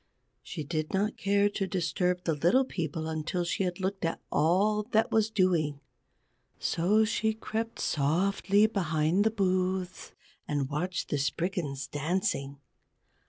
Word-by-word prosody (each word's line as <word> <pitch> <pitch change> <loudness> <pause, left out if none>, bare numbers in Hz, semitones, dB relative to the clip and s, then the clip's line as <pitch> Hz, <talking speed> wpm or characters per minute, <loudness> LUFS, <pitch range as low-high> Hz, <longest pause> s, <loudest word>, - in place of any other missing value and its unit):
She 155 - -6
did 155 +1 -3
not 205 +3 0
care 200 +1 +2
to 195 -1 -2
disturb 180 0 0
the 165 - +1
Little 175 - +3
People 160 - -3
until 160 +3 -2
she 180 +2 -1
had 180 0 -3
looked 190 +1 -2
at 165 - -1
all 190 +8 +3
that 220 +1 +3
was 220 -1 +3
doing. 175 -9 +1 0.8
So 205 +6 +2
she 220 0 0
crept 225 +1 -4
softly 195 +7 +2
behind 175 -3 +1
the 220 - +3
booths 185 -3 -1 0.3
and 145 -2 -1
watched 175 +4 -2
the 145 - 0
Spriggans 145 -1 -2
dancing. 145 -2 -2
180 Hz, 135 wpm, -29 LUFS, 155-200 Hz, 0.8 s, Little